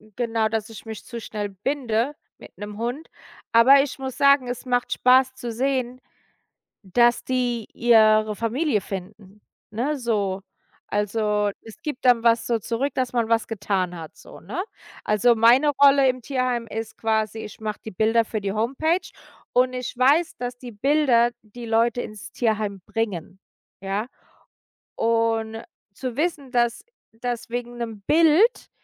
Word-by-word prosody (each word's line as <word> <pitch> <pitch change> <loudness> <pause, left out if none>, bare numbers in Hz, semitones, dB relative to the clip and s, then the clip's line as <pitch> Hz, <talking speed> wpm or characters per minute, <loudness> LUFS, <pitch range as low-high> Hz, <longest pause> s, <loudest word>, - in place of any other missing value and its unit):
genau, 225 -2 0
dass 220 0 -3
ich 225 -1 -11
mich 220 -1 -8
zu 235 -2 -7
schnell 210 -2 -4
binde 240 +4 -2 0.2
mit - - -15
'nem 205 0 -7
Hund. 245 +8 -4 0.4
Aber 260 +4 +7
ich 280 -1 -7
muss 265 -1 -5
sagen, 280 -2 +4
es 245 +2 -5
macht 245 -1 0
Spaß 260 +1 +4
zu 245 -2 -5
sehen, 255 +1 -1 0.8
dass 235 +5 +3
die 245 -3 -1
ihre 215 -2 +4
Familie 230 +3 0
finden, 195 +2 -9 0.3
ne, 250 +8 -1
so. 205 -6 -1 0.5
Also, 210 0 0
es 225 +9 -14
gibt 295 -4 -5
dann 245 -2 +5
was 230 0 +3
so 230 -2 0
zurück, 240 +7 -2
dass 255 -1 -1
man 235 -2 0
was 230 -1 +1
getan 190 -4 -2
hat 160 -1 -10
so, - - -14
ne? 250 - -5 0.4
Also, 210 +3 +3
meine 240 +6 +5
Rolle 275 -1 +7
im 255 -1 -1
Tierheim 250 -2 -1
ist 220 +1 -6
quasi, 220 0 -1
ich 210 - -9
mache 215 -1 -4
die 220 - -6
Bilder 220 +4 +2
für 215 -1 -4
die 195 -1 -2
Homepage 275 - 0 0.4
und 255 +1 +3
ich 250 -1 -5
weiß, 295 +6 +3
dass 245 0 -5
die 245 -1 -9
Bilder 240 0 +2
die 230 +3 -10
Leute 230 +2 +1
ins 215 -2 -9
Tierheim 215 -4 -1
bringen, 190 -5 -4 0.4
ja? 195 +3 -2 0.9
Und 225 -1 0 0.3
zu 240 +3 -6
wissen, 295 -4 -2
dass 240 -2 +1 0.3
dass 240 +1 -5
wegen 240 0 -5
'nem 225 -3 -6
Bild 330 +9 +4
230 Hz, 155 wpm, -23 LUFS, 215-255 Hz, 0.9 s, Aber